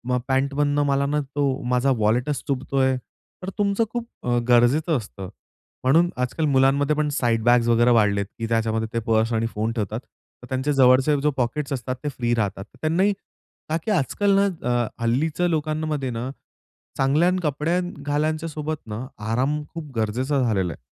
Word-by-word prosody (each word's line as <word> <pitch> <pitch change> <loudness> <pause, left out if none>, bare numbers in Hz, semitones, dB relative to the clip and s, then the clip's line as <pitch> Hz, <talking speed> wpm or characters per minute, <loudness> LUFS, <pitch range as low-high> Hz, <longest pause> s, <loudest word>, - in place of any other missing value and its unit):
अ, - - +2
पॅन्टमधून 140 +2 +1
मला 140 0 +2
ना, 150 +1 0
तो 140 -1 -1
माझा 125 +2 +3
वॉलेटच 120 +7 0
चुभतोय, 135 -1 +1 0.5
तर 185 - -3
तुमचं 200 +2 +2
खूप 240 -1 -3 0.2
अ, 120 0 +1
गरजेचं 140 +7 +4
असतं. 100 -5 -8 0.5
म्हणून 165 +7 +4
आज-काल 125 +5 -1
मुलांमध्ये 140 +1 +3
पण 150 0 0
साईड-बॅग्स 120 -3 +2
वगैरे 120 +1 +4
वाढल्यात, 105 -3 +3
की 115 - -2
त्याच्यामध्ये 110 -1 0
ते 115 - +1
पर्स 110 0 +2
आणि 115 0 +1
फोन 110 +2 -1
ठेवतात, 110 -1 -3 0.4
तर - - -10
त्यांचे 130 +3 0
जवळचे 130 +2 +5
जे 150 - +2
पॉकेट्स 140 +3 -1
असतात, 130 0 -3
ते 150 - -1
फ्री 120 -3 -1
राहतात. 100 -3 -2 0.2
त्यांनाही 180 +6 +2 0.6
का 160 - +1
की 220 - 0
आज-काल 195 +4 +2
ना 200 - +4 0.3
अ, 120 -1 +1 0.2
हल्लीच्या 150 +9 +1
लोकांमध्ये 155 -3 -1
ना, 120 +2 -4 0.7
चांगले 145 +6 +3
कपडे 155 +4 0
घालण्यासोबत 155 -1 -2
ना, 110 +4 -5 0.3
आराम 135 +6 0
खूप 160 -3 -7
गरजेचा 125 +6 0
झालेला 95 -7 0
आहे. - - -17
135 Hz, 155 wpm, -23 LUFS, 120-150 Hz, 0.7 s, जवळचे